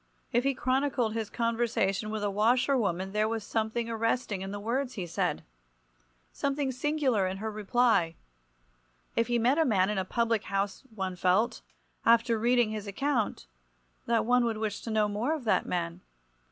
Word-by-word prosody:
If 240 -1 +2
he 275 -1 +2
chronicled 255 -4 0
his 225 -2 -3
conversation 230 -3 0
with 215 -1 -3
a 205 - 0
washer 245 +7 +3
woman 190 -5 -1
there 215 +1 +1
was 225 -1 -2
something 225 +2 -1
arresting 225 -3 -1
in 195 - -4
the 205 +1 -5
words 250 +5 -2
he 185 - -3
said, 170 - -1 0.9
something 280 -1 -1
singular 260 -6 +1
in 190 +1 -3
her 220 +2 -4
reply. 215 -5 +2 1.0
If 230 - +2
he 240 -1 +1
met 250 +6 +3
a - - +5
man 200 -7 +2
in 210 - -1
a - - 0
public 230 +2 0
house 195 0 -2
one 190 -2 -3
felt, 185 +7 +1 0.4
after 230 0 +4
reading 240 -1 +3
his 215 -1 -5
account, 230 - -1 0.6
that 230 -1 +2
one 245 +1 +4
would 230 -2 0
wish 215 -2 -3
to - - -6
know 215 -1 +2
more 225 +9 -1
of 300 - -7
that 225 - +1
man. 170 0 -2
225 Hz, 175 wpm, -29 LUFS, 205-245 Hz, 1.0 s, a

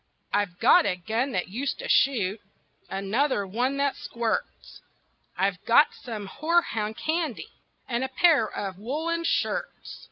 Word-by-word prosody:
I've 200 -4 0
got - - +5
a - - +1
gun 225 +9 -2
that 180 -1 -1
used 265 +8 -3
to - - -6
shoot, 220 -7 +2 0.5
Another 205 +4 0
one 245 +8 -1
that 280 -1 +1
squirts, 235 -2 -4 0.6
I've 185 0 0
got 240 +6 +5
some 220 -4 -7
horehound 230 - 0
candy 315 -5 -2 0.4
And 240 +1 -1
a 265 - -2
pair 280 -3 +4
of 195 -2 -5
woolen 320 +9 -2
shirts. 335 - -2
235 Hz, 135 wpm, -26 LUFS, 200-280 Hz, 0.6 s, got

